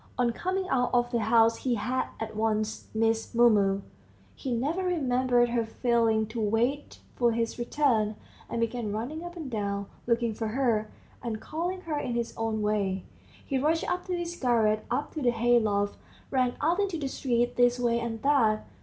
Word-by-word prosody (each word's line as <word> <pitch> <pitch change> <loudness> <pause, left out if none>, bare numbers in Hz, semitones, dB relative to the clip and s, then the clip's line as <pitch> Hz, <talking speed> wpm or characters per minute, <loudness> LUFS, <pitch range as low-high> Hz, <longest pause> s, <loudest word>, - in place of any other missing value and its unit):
On 245 -1 +2
coming 370 +8 -2
out 250 -6 +1
of 240 0 +2
the 235 - +1
house 225 +1 +4
he 250 -2 0
had 250 +4 -1
at 220 -1 -5
once 215 0 -1
missed 225 +1 0
Mumu. 205 -5 +4 0.5
He 260 - -5
never 285 +10 0
remembered 255 -8 +2
her 235 -1 +1
failing 225 -1 +1
to 225 0 -4
wait 235 +7 0
for 240 -2 +2
his 230 +1 -2
return, 240 -5 +1 0.3
and 235 - -2
began 230 -2 -1
running 250 +10 -4
up 350 0 -7
and 320 -5 -6
down, 200 -4 -2 0.2
looking 235 -1 +1
for 225 +1 -3
her, 220 -3 0 0.3
and 230 -2 -3
calling 350 +8 -3
her 310 -4 -2
in 250 -4 -3
his 235 -1 -2
own 220 -1 -1
way.... 200 -3 0 0.4
He 270 -2 0
rushed 315 +4 +1
up 360 0 -1
to 360 -1 -1
his 345 0 -4
garret, 225 -6 +1
up 295 - -1
to 310 - -4
the 250 - +3
hay 240 +1 +3
loft, 205 -2 0 0.3
ran 255 -2 +1
out 335 +6 +2
into 390 -4 0
the 285 -3 -3
street, 245 -2 0
this 245 0 +3
way 235 -1 +2
and 230 -1 -4
that. 235 -7 +3
240 Hz, 185 wpm, -28 LUFS, 220-270 Hz, 0.5 s, house